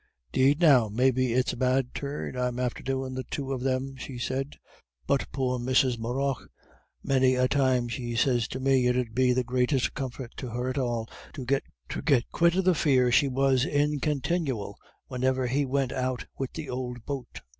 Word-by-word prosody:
"'Deed, 140 - +3
now, 135 -10 +5
maybe 130 +3 +2
it's 125 +2 +1
a - - -5
bad 130 0 +1
turn 140 -2 -4
I'm 125 -1 -1
after 125 -1 -2
doin' 130 0 -3
the 130 0 -3
two 135 +1 -4
of 130 - -4
them," 135 +1 -1
she 130 -1 -7
said; 135 +3 -3 0.5
"but 140 - 0
poor 125 -2 -1
Mrs. 125 0 +2
Morrough, 130 +3 -1 0.7
many 130 -1 +3
a 130 0 +3
time 130 -3 +2
she 120 0 -4
sez 120 -1 +2
to 130 - -5
me 130 -1 +3
it 125 0 +2
'ud 120 -3 -2
be 125 +1 +3
the 125 0 +1
greatest 125 +1 +1
comfort 130 -3 -5
to 130 - -5
her 125 +2 -2
at 130 +2 -2
all 120 -3 -1 0.3
to 130 - -6
get 135 0 -1
quit 170 0 +3
of 190 -1 +1
the 185 - +5
fear 130 -6 +3
she 140 +4 +4
was 135 -1 +2
in 145 -1 +1
continyal 140 - -1 0.3
wheniver 130 0 0
he 140 +3 0
went 135 -1 0
out 130 -1 -2
wid 135 -1 -3
the 160 -3 -5
ould 125 -2 -5
boat. 135 -4 -6
130 Hz, 190 wpm, -27 LUFS, 125-135 Hz, 0.7 s, now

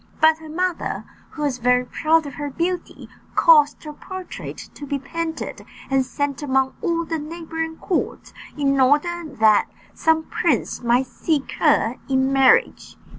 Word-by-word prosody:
But 315 0 +5
her 315 -1 -11
mother, 360 +2 -2 0.3
who 300 - -6
was 270 -4 -1
very 250 +1 +3
proud 320 +4 +2
of 280 - -7
her 290 +2 -4
beauty, 345 +5 -3 0.3
caused 300 -3 +5
her 300 -1 -7
portrait 375 +4 -8 0.2
to 290 - -9
be 280 - -1
painted, 320 +4 -5 0.3
and 270 -1 +3
sent 285 +2 -3
among 265 -2 +1
all 335 -1 0
the 325 -1 -3
neighbouring 325 +1 -5
courts, 365 - -3 0.2
in 275 -1 +1
order 300 +6 +2
that 220 -8 +3 0.3
some 320 0 +2
prince 310 -6 -1
might 240 +2 +2
seek 285 +3 -2
her - - +3
in 265 0 +2
marriage. 270 -1 +3
295 Hz, 150 wpm, -22 LUFS, 270-325 Hz, 0.3 s, But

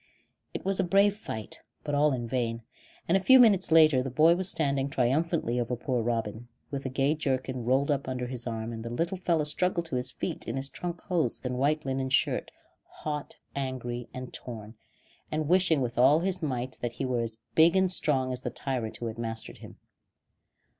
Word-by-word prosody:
It - - -6
was 195 0 +1
a - - +3
brave 200 +3 +4
fight, 110 - -6 0.2
but 145 - -3
all 145 +1 +4
in 120 -3 -2
vain, 115 -1 -2 0.4
and 170 - +3
a - - +5
few 260 +6 +8
minutes 205 -8 +5
later 155 -5 +6
the 135 - -3
boy 155 +6 +5
was 185 +1 +2
standing 140 -4 0
triumphantly 135 0 0
over 120 +1 -1
poor 125 0 -1
Robin, 115 0 -2 0.2
with 140 -1 -3
the 135 - -4
gay 135 +3 +1
jerkin 130 -4 -2
rolled 135 +4 +2
up 140 -2 -1
under 125 -1 -3
his 125 -1 -3
arm; 115 0 -4
and 110 0 -6
the 115 - -5
little 165 +10 -1
fellow 170 -4 +1
struggled 170 +3 0
to 140 -6 -2
his 125 - +1
feet - - -4
in - - -3
his 135 +1 -3
trunk 175 +2 -5
hose 170 - -1
and 125 -1 -3
white 150 +2 +1
linen 135 0 -1
shirt, 130 - +1 0.4
hot, 150 -1 -5 0.2
angry, 125 -3 -4
and 130 0 -8
torn, 110 -3 -7 0.6
and 155 -1 -1
wishing 175 -4 +4
with 120 -1 -2
all 140 +6 +6
his 185 0 0
might 130 -4 -3
that 120 -1 -2
he 135 - -3
were 125 -2 0
as 115 -1 -3 0.2
big 165 +3 +5
and 190 -1 +3
strong 130 -7 0
as 125 - -4
the - - -3
tyrant 125 -5 -3
who 120 - -5
had 115 0 -5
mastered 115 -1 -5
him. - - -12
135 Hz, 205 wpm, -28 LUFS, 120-160 Hz, 0.6 s, few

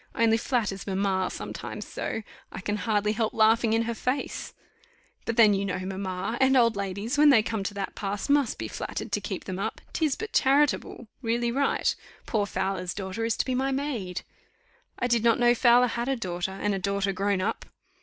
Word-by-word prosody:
Only 225 -1 +4
flatters 220 -6 -1
mamma 190 -1 0
sometimes - - -6
so, 225 - -4 0.3
I - - -6
can 205 +2 -2
hardly 210 +1 +1
help 220 0 -1
laughing 225 +1 +4
in 225 0 +2
her 235 0 -2
face; 255 +4 -3 0.7
but 230 - -2
then 215 -3 +7
you 195 0 0
know 185 -2 -2
mamma, 190 +3 -3
and 265 0 +5
old 230 -3 +4
ladies, 200 +7 -2
when 300 0 +8
they 230 -6 +6
come 220 -2 -2
to 200 +1 -4
that 195 -1 -3
pass, 200 0 -3
must 285 -4 +2
be - - -4
flattered - - -5
to - - 0
keep - - -4
them 185 -1 -5
up - - -3
'tis 310 -5 +1
but 440 0 -6
charitable 275 -3 +2
really 235 0 0
right. 275 +3 +1 0.3
Poor 210 -3 0
Fowler's 190 -2 -2
daughter 195 +3 -3
is 230 - 0
to - - 0
be 260 - -1
my 265 +2 0
maid." 255 -10 -3 0.7
"I - - -1
did 235 -2 +2
not 230 -1 +4
know 240 0 +5
Fowler 245 +1 +5
had 235 +1 -2
a 270 - +2
daughter, 180 -5 -3
and 205 +1 -1
a 195 - -1
daughter 200 0 0
grown 195 +1 0
up." 185 - -2
220 Hz, 200 wpm, -27 LUFS, 195-240 Hz, 0.7 s, when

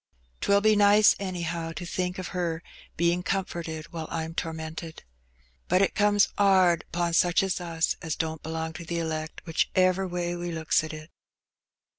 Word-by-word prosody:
'Twill 200 0 +3
be 215 0 +4
nice, 205 +1 +6
any 185 -3 -3
how, 165 0 -3
to 175 +2 -6
think 180 +1 -2
o' 185 - -4
her 170 -2 -3 0.3
bein' 170 +1 +2
comforted 170 -4 -4
while 160 -2 -5
I'm 160 0 -4
tormented. 160 0 -5 0.6
But 185 +2 +4
it - - +1
comes 205 -1 +3
'ard 185 -4 +4
'pon 175 0 -1
such 175 +2 +3
as 190 -1 -1
us 165 -1 -1
as 160 -3 -3
don't 160 -1 -3
belong 160 0 -4
to 170 - -8
the 170 +1 -3
elect, 160 -1 -4
whichever 185 +3 +2
way 175 -1 -2
we 175 0 -4
looks 160 -1 +1
at 155 - -5
it." 155 +1 -10
170 Hz, 170 wpm, -27 LUFS, 160-185 Hz, 0.6 s, nice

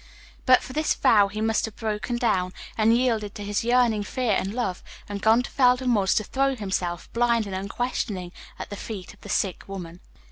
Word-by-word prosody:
But 255 0 +6
for 255 - -8
this 310 +2 +1
vow 205 -3 +5
he 210 +2 -5
must 225 0 +1
have 220 - -9
broken 220 +2 -3
down, 195 -7 0 0.2
and 225 +1 +4
yielded 225 -5 0
to 205 - -6
his 205 +1 -1
yearning 240 -3 +3
fear 245 +3 -1
and 195 0 0
love, 210 -6 -2 0.3
and 205 -1 -5
gone 225 +3 +4
to - - -8
Felden 250 -1 +3
Woods 195 -3 +2
to 215 - +2
throw 270 +5 0
himself, 190 -5 -3
blind 235 -1 +2
and 200 - -6
unquestioning, 195 -2 -3 0.3
at - - -7
the - - -4
feet 200 -3 -7
of - - -23
the - - -11
sick 190 -3 -1
woman. 180 -3 -7
215 Hz, 205 wpm, -25 LUFS, 195-240 Hz, 0.3 s, But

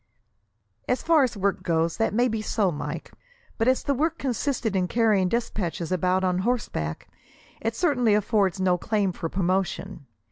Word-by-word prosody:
"As 250 - 0
far 325 -2 +4
as 250 -5 0
work 200 0 0
goes 165 -1 0
that 225 - +1
may 240 +4 +2
be 225 -2 -2
so, 210 -3 +1
Mike; 150 - -5 0.5
but 225 - +2
as 260 0 +3
the 280 - +1
work 315 +4 0
consisted 250 -5 -1
in 185 -1 +1
carrying 210 -4 +2
despatches 185 -7 -2
about 185 +1 +1
on 180 -1 +1
horseback, 190 - -2 0.5
it 225 0 -2
certainly 250 - +2
affords 200 -3 +1
no 180 -1 +2
claim 205 -2 0
for 165 -2 -5
promotion. 185 -6 -2
205 Hz, 165 wpm, -25 LUFS, 185-240 Hz, 0.5 s, far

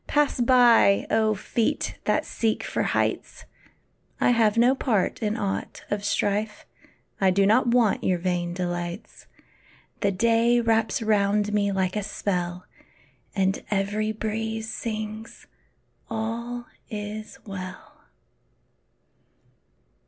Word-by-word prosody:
Pass 295 -4 +1
by, 240 -5 +5
oh, 220 0 +3
feet 220 +3 -2
that - - +1
seek 225 -2 -1
for - - -2
heights! - - -1 0.7
I - - +4
have 225 -2 +3
no 245 +3 +5
part 235 -5 0
in 215 0 -1
aught 200 -3 -3
of 205 -1 -1
strife; 205 +1 -1 0.5
I 195 - +4
do 195 +2 +3
not 220 +5 +4
want 235 -4 +3
your 185 - +2
vain 175 -1 -2
delights. 175 +1 -5 0.7
The 200 - +1
day 230 +4 +3
wraps 225 -1 +1
round 210 -1 +2
me 200 -1 +2
like 190 -1 -1
a 210 - 0
spell, 180 -3 -3 0.7
And 195 -1 0
every 210 +2 0
breeze 220 +1 -3
sings, 220 0 -6 0.6
"All 235 +2 -4 0.2
is 215 0 -6
well." 185 -3 -9
215 Hz, 115 wpm, -25 LUFS, 195-225 Hz, 0.7 s, by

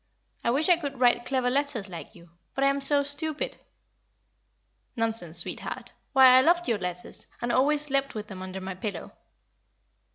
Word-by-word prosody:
I - - +1
wish 275 +6 +3
I 355 -2 +5
could 285 -5 -6
write 240 -1 +3
clever 255 -2 0
letters 275 -6 -1
like 175 -3 -9
you. 170 -1 -17 0.2
But 275 - 0
I 275 - +5
am 280 0 -3
so 285 +1 +4
stupid!" 300 +2 -4 1.4
"Nonsense, 225 -8 -1
sweetheart. 170 - -4 0.2
Why, 260 -2 +8
I - - +6
loved 345 +4 +3
your 230 -4 0
letters, 180 -1 -5
and 240 0 -2
always 290 +4 +3
slept 275 -3 -1
with 210 -1 -4
them 190 -3 -9
under 190 0 -6
my 190 0 -5
pillow." 185 -1 -6
255 Hz, 170 wpm, -27 LUFS, 195-280 Hz, 1.4 s, Why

